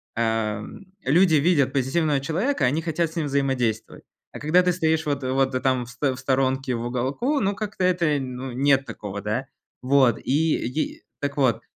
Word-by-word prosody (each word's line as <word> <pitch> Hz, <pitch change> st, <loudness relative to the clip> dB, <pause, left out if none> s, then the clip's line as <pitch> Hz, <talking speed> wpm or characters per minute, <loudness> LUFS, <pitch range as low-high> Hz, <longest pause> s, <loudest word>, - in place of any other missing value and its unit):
ам, 110 Hz, -, -2 dB, 0.2 s
люди 165 Hz, +5 st, +4 dB
видят 150 Hz, -2 st, +3 dB
позитивного 140 Hz, +2 st, +1 dB
человека, 165 Hz, -, 0 dB
они 140 Hz, +6 st, +1 dB
хотят 165 Hz, 0 st, -1 dB
с -, -, -14 dB
ним 155 Hz, -3 st, 0 dB
взаимодействовать, 135 Hz, -5 st, -1 dB, 0.3 s
а -, -, -7 dB
когда 155 Hz, +5 st, +4 dB
ты 180 Hz, 0 st, +2 dB
стоишь 160 Hz, -2 st, 0 dB
вот 145 Hz, -2 st, -2 dB
вот 130 Hz, 0 st, 0 dB
там 130 Hz, -2 st, +1 dB
в -, -, -13 dB
сто 130 Hz, +2 st, -1 dB
в -, -, -10 dB
сторонке 130 Hz, -1 st, 0 dB
в 115 Hz, -, -4 dB
уголку, 135 Hz, -, -1 dB
ну, 200 Hz, -2 st, 0 dB
как-то 205 Hz, -3 st, -3 dB
это, 170 Hz, -5 st, +2 dB
ну, 130 Hz, 0 st, -5 dB
нет 135 Hz, +1 st, +3 dB
такого, 100 Hz, -5 st, -6 dB
да. 110 Hz, +6 st, -2 dB, 0.4 s
Вот, 130 Hz, -2 st, +3 dB
и 155 Hz, +4 st, +1 dB
и 140 Hz, +6 st, -3 dB, 0.2 s
так 140 Hz, 0 st, -3 dB
вот, 130 Hz, -5 st, +2 dB
135 Hz, 180 wpm, -24 LUFS, 125-160 Hz, 0.4 s, люди